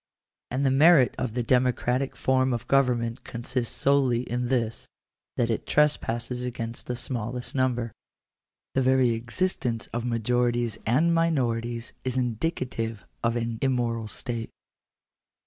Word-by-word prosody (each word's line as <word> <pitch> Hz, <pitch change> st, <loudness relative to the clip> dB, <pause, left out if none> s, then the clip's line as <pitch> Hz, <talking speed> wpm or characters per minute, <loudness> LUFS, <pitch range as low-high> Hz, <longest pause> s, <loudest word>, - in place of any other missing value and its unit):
And 135 Hz, +3 st, -1 dB
the 135 Hz, -, +4 dB
merit 140 Hz, -1 st, +6 dB
of 120 Hz, -3 st, -2 dB
the 120 Hz, -, 0 dB
democratic 125 Hz, +2 st, +1 dB
form 130 Hz, -1 st, +2 dB
of 120 Hz, -, -4 dB
government 125 Hz, -3 st, +1 dB
consists 120 Hz, +1 st, -3 dB
solely 135 Hz, -4 st, +3 dB
in 125 Hz, 0 st, -2 dB
this, 120 Hz, -3 st, -1 dB, 0.5 s
that 120 Hz, -1 st, +2 dB
it 110 Hz, -, -3 dB
trespasses 125 Hz, -5 st, +1 dB
against 115 Hz, -2 st, -5 dB
the 125 Hz, -, -2 dB
smallest 120 Hz, 0 st, -4 dB
number. 125 Hz, -3 st, 0 dB, 0.8 s
The 135 Hz, -, +2 dB
very 130 Hz, -1 st, +4 dB
existence 120 Hz, 0 st, -1 dB
of 120 Hz, 0 st, -2 dB
majorities 120 Hz, -1 st, 0 dB
and 155 Hz, +9 st, +3 dB
minorities 120 Hz, -8 st, 0 dB
is 130 Hz, 0 st, -2 dB
indicative 120 Hz, -3 st, -2 dB, 0.2 s
of 115 Hz, 0 st, +1 dB
an 115 Hz, -1 st, -2 dB
immoral 120 Hz, -4 st, 0 dB
state. 115 Hz, +1 st, -4 dB
125 Hz, 130 wpm, -26 LUFS, 115-130 Hz, 0.8 s, merit